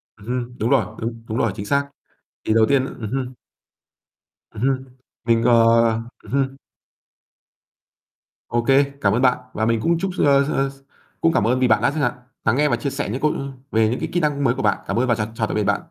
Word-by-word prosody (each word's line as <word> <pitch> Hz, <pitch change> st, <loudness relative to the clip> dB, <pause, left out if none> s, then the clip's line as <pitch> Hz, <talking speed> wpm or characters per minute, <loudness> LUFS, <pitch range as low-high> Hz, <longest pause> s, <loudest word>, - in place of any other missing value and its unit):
Ừm 105 Hz, -, -16 dB
hưm, 125 Hz, 0 st, -3 dB
đúng 110 Hz, -, 0 dB
rồi, -, -, +3 dB, 0.2 s
đúng, 115 Hz, 0 st, -5 dB
đúng 110 Hz, +1 st, -3 dB
rồi, 115 Hz, -, +1 dB
chính 100 Hz, -, -6 dB
xác. 140 Hz, +3 st, 0 dB, 0.5 s
Thì 110 Hz, -, +1 dB
đầu 110 Hz, -1 st, +5 dB
tiên 135 Hz, -2 st, +3 dB
ừm 110 Hz, -5 st, -7 dB
hưm. 130 Hz, -1 st, -3 dB, 1.2 s
Ừm 110 Hz, -, -9 dB
hưm, 130 Hz, 0 st, 0 dB, 0.4 s
mình, 115 Hz, -1 st, +2 dB
ờ 120 Hz, 0 st, +4 dB, 0.7 s
ừm -, -, -13 dB
hưm. 135 Hz, 0 st, 0 dB, 1.9 s
OK, 120 Hz, 0 st, -1 dB, 0.4 s
cảm 100 Hz, -, +3 dB
ơn 120 Hz, -, +1 dB
bạn, 125 Hz, -1 st, +4 dB, 0.2 s
và 110 Hz, -, -1 dB
mình 115 Hz, 0 st, +1 dB
cũng 170 Hz, 0 st, +2 dB
chúc 190 Hz, 0 st, -2 dB
s -, -, -5 dB
ơ, 140 Hz, -1 st, +5 dB
ơ, 135 Hz, -1 st, 0 dB
s 135 Hz, -, -13 dB, 0.5 s
cũng 165 Hz, 0 st, +3 dB
cảm -, -, +2 dB
ơn 125 Hz, +2 st, +2 dB
vì 130 Hz, -, +3 dB
bạn 110 Hz, -1 st, +3 dB
đã 120 Hz, -, +2 dB
chẳng 150 Hz, +1 st, -3 dB
hạn 120 Hz, -, +1 dB, 0.3 s
lắng 110 Hz, -, +3 dB
nghe 150 Hz, +1 st, +3 dB
và -, -, +2 dB
chia 140 Hz, -, -3 dB
sẻ 140 Hz, -5 st, -3 dB
những 130 Hz, -, -4 dB
câu, 150 Hz, 0 st, +3 dB
ư 140 Hz, 0 st, -4 dB, 0.2 s
về 110 Hz, 0 st, +3 dB
những 125 Hz, -, -2 dB
cái -, -, -3 dB
kỹ 175 Hz, -, +2 dB
năng 145 Hz, -3 st, 0 dB
mới 120 Hz, -, +3 dB
của 135 Hz, -, -3 dB
bạn. 105 Hz, -3 st, +2 dB
Cảm 115 Hz, -, 0 dB
ơn 130 Hz, -, +1 dB
và 120 Hz, -, +3 dB
chào 105 Hz, -1 st, -2 dB
chào 110 Hz, -1 st, -1 dB
tạm -, -, -4 dB
biệt 105 Hz, -, +1 dB
bạn. -, -, +1 dB
125 Hz, 240 wpm, -21 LUFS, 115-140 Hz, 1.9 s, đầu